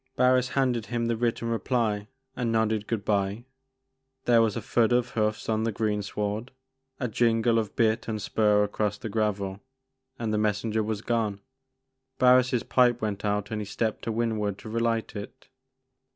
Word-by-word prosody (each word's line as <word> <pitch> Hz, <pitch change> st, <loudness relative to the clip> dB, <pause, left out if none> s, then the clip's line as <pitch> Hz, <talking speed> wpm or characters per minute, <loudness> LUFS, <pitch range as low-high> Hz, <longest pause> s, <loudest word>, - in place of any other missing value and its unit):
Barris 125 Hz, 0 st, +3 dB
handed 125 Hz, -5 st, +1 dB
him 120 Hz, -1 st, -1 dB
the 115 Hz, 0 st, +1 dB
written 115 Hz, 0 st, -1 dB
reply 115 Hz, -3 st, 0 dB, 0.3 s
and 120 Hz, -3 st, -1 dB
nodded 110 Hz, -1 st, +1 dB
good 110 Hz, -4 st, -2 dB
bye: 100 Hz, +2 st, 0 dB, 0.8 s
there 120 Hz, -1 st, +5 dB
was 110 Hz, -3 st, +1 dB
a -, -, -1 dB
thud 115 Hz, 0 st, +2 dB
of 120 Hz, 0 st, +2 dB
hoofs 105 Hz, -1 st, -1 dB
on 110 Hz, 0 st, +1 dB
the 115 Hz, -, 0 dB
greensward, 105 Hz, +1 st, -2 dB, 0.5 s
a 125 Hz, -, -1 dB
jingle 115 Hz, 0 st, +2 dB
of 110 Hz, -3 st, -4 dB
bit 110 Hz, 0 st, +1 dB
and 110 Hz, -2 st, -2 dB
spur 105 Hz, 0 st, +2 dB
across 105 Hz, 0 st, -1 dB
the 110 Hz, -, -6 dB
gravel, 100 Hz, -3 st, -1 dB, 0.6 s
and 110 Hz, -2 st, -2 dB
the 105 Hz, -, +1 dB
messenger 105 Hz, +1 st, 0 dB
was 110 Hz, 0 st, -3 dB
gone. 110 Hz, -4 st, 0 dB, 0.8 s
Barris* 125 Hz, 0 st, +5 dB
pipe 120 Hz, -2 st, +3 dB
went 105 Hz, -3 st, -3 dB
out 105 Hz, 0 st, -1 dB
and 110 Hz, -, -2 dB
be 105 Hz, -, -4 dB
stepped 110 Hz, +2 st, -2 dB
to 115 Hz, -, -1 dB
windward 110 Hz, -3 st, -1 dB
to 110 Hz, -, -10 dB
relight 115 Hz, -1 st, -1 dB
it. 105 Hz, 0 st, -9 dB
110 Hz, 165 wpm, -27 LUFS, 105-115 Hz, 0.8 s, there